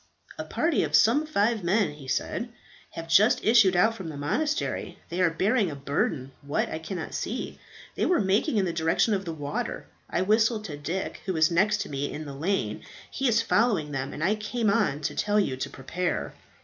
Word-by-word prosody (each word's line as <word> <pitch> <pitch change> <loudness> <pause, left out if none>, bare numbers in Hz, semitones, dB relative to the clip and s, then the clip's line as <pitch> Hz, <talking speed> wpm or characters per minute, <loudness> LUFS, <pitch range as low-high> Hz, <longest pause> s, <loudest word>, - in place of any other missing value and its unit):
"A - - -2
party 325 -3 0
of - - 0
some 285 +8 +4
five 220 -6 +1
men," 195 +2 +2
he 145 -2 -12
said, 230 - -2 0.4
"have 165 0 -6
just 195 +8 +4
issued 215 -5 +5
out 220 +6 +4
from 190 -7 -7
the 150 - -7
monastery. 295 - -2
They 175 +2 -2
are 180 - +5
bearing 195 +5 +1
a 145 - -6
burden 140 -1 -2
what, 145 +1 -1
I 160 - -4
cannot 160 0 -6
see. - - -4 0.3
They - - 0
were 360 - +3
making 210 - +1
in 195 - +2
the 170 - -2
direction 165 +6 +2
of 195 -1 -1
the 165 - -3
water. 145 -2 -4 0.2
I - - 0
whistled 220 +2 +2
to 150 - -5
Dick, 165 +6 -4
who 190 - 0
was 160 0 +3
next 205 +4 +2
to - - -5
me 140 0 -3
in 155 +1 -6
the 140 - -7
lane. 140 - -1 0.3
He 270 - -1
is 230 -1 +3
following 210 -10 +2
them, 135 -1 -3
and 155 - -5
I 190 +4 +3
came 215 0 -1
on 190 -9 +1
to 145 - -2
tell 210 0 +1
you 165 -10 0
to - - -3
prepare." 135 - -3
185 Hz, 210 wpm, -27 LUFS, 150-215 Hz, 0.4 s, issued